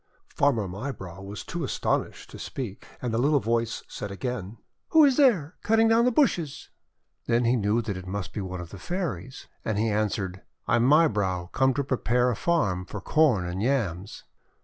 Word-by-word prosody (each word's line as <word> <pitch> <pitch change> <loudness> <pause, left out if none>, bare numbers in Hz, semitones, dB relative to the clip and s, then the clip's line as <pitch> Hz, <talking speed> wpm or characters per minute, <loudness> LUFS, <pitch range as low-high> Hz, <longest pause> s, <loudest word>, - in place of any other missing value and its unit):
Farmer 125 -8 +1
Mybrow 95 -3 -6
was 100 0 -7
too - - -4
astonished - - -2
to - - -10
speak, 115 -8 -6 0.2
and 120 -2 -1
the 115 - +1
little 145 +3 +3
voice 115 -1 -1
said 105 - -6
again: 110 0 -5 0.3
'Who 315 -2 +7
is 275 -2 +4
there, 200 - +4
cutting 225 +1 +4
down 225 +1 +4
the 250 - +4
bushes?' 180 - +1 0.6
Then 120 +1 +2
he 120 +2 +3
knew 110 +1 +1
that 105 -4 -3
it 95 0 -8
must 95 -2 -4
be 105 - -3
one 95 -1 -5
of 85 - -10
the 100 - -9
Fairies, 135 - -4 0.2
and 110 -2 -1
he 110 +1 +1
answered: 100 -3 -1
— - - -45
'I - - +3
am 120 +1 +3
Mybrow 100 - +2
come 130 -1 +2
to 140 - 0
prepare 125 -1 +1
a - - -2
farm 100 - +1
for 105 - -6
Corn 125 - +3
and 90 +2 -3
Yams." 105 -7 -1
115 Hz, 195 wpm, -26 LUFS, 95-140 Hz, 0.6 s, Who